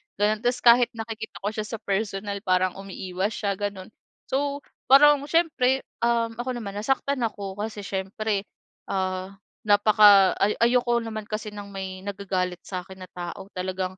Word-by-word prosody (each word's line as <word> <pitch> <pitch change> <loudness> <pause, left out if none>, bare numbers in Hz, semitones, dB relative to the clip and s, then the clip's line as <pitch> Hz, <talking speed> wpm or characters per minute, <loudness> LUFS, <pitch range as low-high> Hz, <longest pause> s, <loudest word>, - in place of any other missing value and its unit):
ganun. 210 +2 +1
Tapos 245 0 +1
kahit 240 0 +7
nakikita 225 -1 -6
ko 200 - -1
siya 215 -1 -4
sa 220 - -5
personal 200 0 -2
parang 185 0 +2
umiiwas 195 +1 -4
siya, 200 -4 -2
ganun. 200 -2 -4 0.4
So, 280 +1 -1 0.3
parang 290 +1 +7
siyempre, 285 -5 +2 0.2
um, 230 -1 +1
ako 245 +2 -3
naman 210 -5 -6
nasaktan 270 +4 0
ako 200 -3 -5
kasi 215 -1 -5
siyempre, 200 +1 -2 0.4
ah, 190 0 -3 0.3
napaka 205 -2 +6
ay 205 - +2
ayoko 240 0 +3
naman 220 -2 -5
kasi 215 +1 -5
ng 205 -1 -8
may 190 -1 -6
nagagalit 190 -3 -2
sa'kin 190 0 -7
na - - -50
tao, 180 +2 -7
talagang, 185 0 -3
205 Hz, 150 wpm, -25 LUFS, 190-235 Hz, 0.4 s, kahit